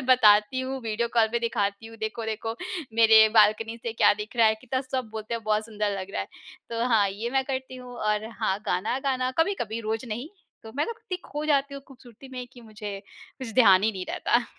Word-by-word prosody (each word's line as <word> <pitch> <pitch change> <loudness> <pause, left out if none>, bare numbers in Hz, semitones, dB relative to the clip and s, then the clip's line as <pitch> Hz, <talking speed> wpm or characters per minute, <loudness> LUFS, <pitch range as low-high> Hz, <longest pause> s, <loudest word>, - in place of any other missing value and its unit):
बस - - -6
बताती 245 0 +5
हूँ 260 +1 -4
वीडियो 225 +1 -1
कॉल 225 -1 +5
पे 235 - +2
दिखाती 205 -2 -1
हूँ 225 0 -12
देखो, 220 +1 -4
देखो 220 +1 -3 0.4
मेरे 220 -1 +7
बाल्कनी 220 +1 +4
से 230 - -3
क्या 225 - +5
दिख 210 +3 -8
रहा 230 -1 +6
है, 220 - +4
कितना 255 0 -2
सब 255 -3 -4
बोलते 220 +1 -4
हैं 230 - -4
बहुत 215 0 +1
सुंदर 210 -3 -2
लग 190 +1 -6
रहा - - -2
है। - - -11 0.4
तो 230 +1 -1
हाँ 215 -4 +4
ये 210 +5 -4
मैं 265 +1 +1
करती 260 -1 -4
हूँ 250 -1 -10
और 215 0 -1
हाँ 190 - +1
गाना, 210 +8 0
गाना 260 -2 0
कभी-कभी 280 - 0
रोज 220 +2 -3
नहीं 240 +7 -4 0.3
तो 220 - -10
मैं 295 - +2
ना - - -3
इत्ती 440 -5 -5
खो 295 +1 -5
जाती 280 -2 +1
हूँ 275 - -8
खूबसूरती 255 -1 -15
में 250 -1 -6
कि 245 - -14
मुझे 210 -3 -7 0.4
कुछ 255 -4 -6
ध्यान 195 -7 +6
ही 220 +1 +2
नहीं 185 -1 -5
रहता। 240 0 +1
225 Hz, 225 wpm, -26 LUFS, 215-255 Hz, 0.4 s, मेरे